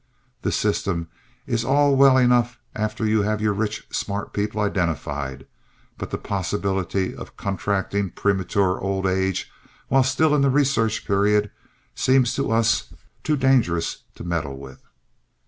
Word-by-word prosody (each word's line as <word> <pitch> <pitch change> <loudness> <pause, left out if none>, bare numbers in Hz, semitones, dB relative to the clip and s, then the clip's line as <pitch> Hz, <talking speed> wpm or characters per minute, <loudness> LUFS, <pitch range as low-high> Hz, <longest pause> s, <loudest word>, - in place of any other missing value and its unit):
The - - -1
system 85 -4 -1 0.4
is 115 -2 -1
all 140 +2 +3
well 135 -1 +6
enough 125 -1 +3 0.2
after 110 +1 -2
you 110 0 +3
have 105 +1 0
your 105 -1 +1
rich, 110 +2 -3
smart 100 0 -3
people 105 +1 -2
identified, 75 -9 -2 0.5
but - - -5
the - - -3
possibility 95 0 -2
of - - -10
contracting 100 0 -1
premature 95 0 0
old 95 0 -2
age 95 0 0 0.4
while 135 - +4
still 140 +4 +2
in 150 - +3
the 140 - +4
research 130 -6 +1
period 105 0 +2 0.4
seems 130 -2 +3
to 135 -3 -1
us 115 0 +2 0.3
too 155 -1 +1
dangerous 125 -11 +2 0.2
to - - -9
meddle 80 -6 -3
with. 65 -1 -11
105 Hz, 140 wpm, -23 LUFS, 95-125 Hz, 0.5 s, well